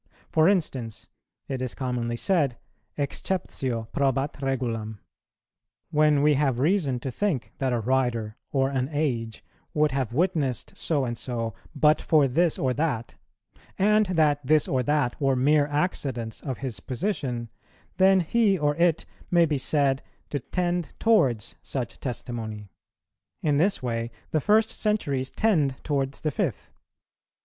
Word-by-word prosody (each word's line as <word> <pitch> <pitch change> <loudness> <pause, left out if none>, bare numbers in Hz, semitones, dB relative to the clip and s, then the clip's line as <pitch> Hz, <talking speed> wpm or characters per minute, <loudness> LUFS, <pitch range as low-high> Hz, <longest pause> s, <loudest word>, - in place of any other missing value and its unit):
For 160 +3 +5
instance, 130 - -2 0.4
it 130 -2 -3
is 130 -2 -3
commonly 125 -3 -2
said, 145 -3 +1 0.4
Exceptio 140 -6 -2
probat 135 0 +1
regulam; 115 -5 -2 0.9
when 150 -1 +4
we 150 0 +5
have 135 -3 +1
reason 145 -3 +1
to 130 - -3
think 165 - -1
that 135 -1 0
a 120 - +1
writer 115 -3 0 0.2
or 135 -1 +1
an 130 0 -1
age 120 -7 -2 0.3
would 150 -1 +3
have 130 -3 -1
witnessed 145 -4 0
so 145 -5 0
and 120 -1 -3
so, 115 -2 -3 0.2
but 150 +1 +4
for 150 -4 +4
this 165 +6 +2
or 130 -1 +1
that, 130 -5 -1 0.6
and 210 +1 +4
that 155 -5 +2
this 150 +3 +3
or 130 - +1
that 145 -1 0
were 135 -1 +3
mere 145 +3 +3
accidents 140 -7 -2
of 130 -4 -4
his 115 -8 -4
position, 125 - -3 0.5
then 190 0 +5
he 200 +3 +2
or 150 -2 +1
it 170 -2 +2 0.2
may 170 -1 +5
be 150 -3 0
said 135 -1 +1 0.3
to 145 - -1
tend 175 +4 -2
towards 135 - +2
such 125 -4 -4
testimony. 110 -5 -5 0.7
In 150 -2 +2
this 185 0 +1
way 115 -1 -2 0.2
the 155 - +1
first 215 +4 +3
centuries 140 - -1
tend 155 -12 +2
towards 140 -2 -1
the 155 - 0
fifth. - - -3
140 Hz, 140 wpm, -26 LUFS, 125-155 Hz, 0.9 s, For